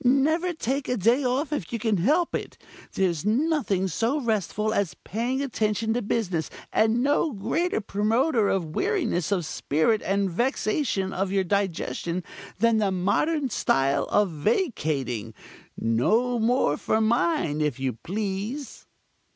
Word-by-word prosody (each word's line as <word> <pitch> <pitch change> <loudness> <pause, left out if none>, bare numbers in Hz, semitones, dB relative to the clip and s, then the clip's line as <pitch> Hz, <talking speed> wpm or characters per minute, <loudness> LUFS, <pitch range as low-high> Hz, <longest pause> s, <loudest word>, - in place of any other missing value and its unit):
Never 305 +8 +3
take 275 -4 -2
a 250 - +1
day 235 +8 +3
off 270 +5 0
if 195 - -4
you 235 - -1
can 220 -2 0
help 305 - +2
it. - - -4 0.4
There's 175 -5 0
nothing 225 - +1
so 230 +9 0
restful 215 -3 -1
as 195 -10 0
paying 245 +6 -2
attention 220 -3 0
to 245 - 0
business, 195 -7 -1 0.2
and 225 +3 +3
no 290 +3 +2
greater 315 - -1
promoter 220 +3 +1
of 170 -5 -1
weariness 365 - 0
of 180 -5 +1
spirit 160 +7 +1
and 195 +1 0
vexation 215 - 0
of 190 0 -1
your 195 -1 +2
digestion 180 -2 -2 0.3
than 230 +2 +3
the 210 -2 +2
modern 240 - 0
style 135 -4 +1
of 205 -3 +2
vacating. 145 - -1 0.4
No 220 - +1
more 225 - +2
for 220 - 0
mine, 225 - +1
if 150 -4 -1
you 130 -1 -1
please." 205 - -5
215 Hz, 140 wpm, -25 LUFS, 185-255 Hz, 0.4 s, Never